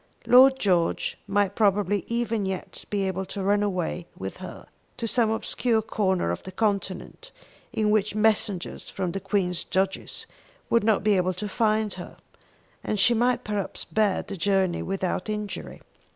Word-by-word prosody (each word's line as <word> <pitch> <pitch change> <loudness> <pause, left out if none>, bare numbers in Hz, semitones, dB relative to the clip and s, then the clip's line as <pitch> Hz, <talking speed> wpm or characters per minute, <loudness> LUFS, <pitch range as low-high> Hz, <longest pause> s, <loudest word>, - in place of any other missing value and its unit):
Lord 265 +2 +7
George 180 -7 +1
might 200 -1 +1
probably 205 -2 +2
even 230 -2 -1
yet 190 -1 -5
be 205 -1 0
able 190 0 -2
to 195 +1 -5
run 205 +1 +3
away 180 -3 -2
with 95 +1 -6
her - - -9 0.3
to 230 - -2
some 225 0 +2
obscure 225 0 0
corner 190 - 0
of 85 - -4
the 190 - -9
continent 200 - -2 0.4
in 210 -1 +1
which 210 -1 +1
messengers 210 -4 0
from 185 -3 -2
the 195 - -3
Queen's 180 -3 0
judges 190 0 -1 0.5
would 235 - +4
not 215 -3 +2
be 210 -1 +4
able 185 0 +1
to 210 +4 -3
find 215 -1 +1
her; 180 - -9 0.7
and 210 - -1
she 195 +6 +5
might 245 +1 +2
perhaps 205 -2 -3
bear 215 -3 +1
the 200 - -7
journey 190 0 +1
without 190 +1 -2
injury. 210 -1 -5
205 Hz, 160 wpm, -26 LUFS, 190-215 Hz, 0.7 s, Lord